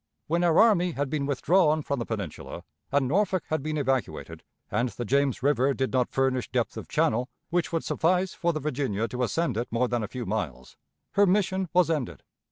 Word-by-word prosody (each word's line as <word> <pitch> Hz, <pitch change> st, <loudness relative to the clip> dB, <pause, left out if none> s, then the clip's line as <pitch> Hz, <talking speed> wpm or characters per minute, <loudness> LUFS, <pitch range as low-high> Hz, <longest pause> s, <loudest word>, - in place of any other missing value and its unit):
When 170 Hz, +3 st, 0 dB
our 170 Hz, -2 st, +3 dB
army 180 Hz, -6 st, +4 dB
had 140 Hz, -1 st, -2 dB
been 145 Hz, -3 st, -1 dB
withdrawn 155 Hz, +2 st, +3 dB
from 140 Hz, -2 st, -2 dB
the 120 Hz, -, -4 dB
Peninsula, 100 Hz, -8 st, -5 dB, 0.3 s
and 140 Hz, -1 st, +2 dB
Norfolk 185 Hz, +3 st, +1 dB
had 155 Hz, -1 st, 0 dB
been 155 Hz, +2 st, -3 dB
evacuated, 135 Hz, -3 st, -2 dB, 0.3 s
and 120 Hz, +1 st, +1 dB
the 120 Hz, -, -6 dB
James 140 Hz, +1 st, +1 dB
River 140 Hz, -1 st, +2 dB
did 130 Hz, 0 st, -1 dB
not 125 Hz, -2 st, +2 dB
furnish 130 Hz, -2 st, 0 dB
depth -, -, -1 dB
of -, -, -7 dB
channel 125 Hz, +4 st, +1 dB, 0.2 s
which 175 Hz, 0 st, 0 dB
would 165 Hz, -1 st, -1 dB
suffice 180 Hz, +3 st, +1 dB
for 170 Hz, -1 st, 0 dB
the 155 Hz, -, -3 dB
Virginia 130 Hz, -7 st, -1 dB
to 125 Hz, +4 st, -4 dB
ascend 125 Hz, 0 st, 0 dB
it 120 Hz, -, -1 dB
more 120 Hz, +2 st, +1 dB
than 120 Hz, -1 st, -1 dB
a 105 Hz, -, -3 dB
few 125 Hz, +2 st, -6 dB
miles, 80 Hz, -, -4 dB, 0.4 s
her 200 Hz, 0 st, +4 dB
mission 190 Hz, -1 st, +1 dB
was 175 Hz, -2 st, +3 dB
ended. 145 Hz, -7 st, -3 dB
140 Hz, 200 wpm, -27 LUFS, 125-170 Hz, 0.4 s, army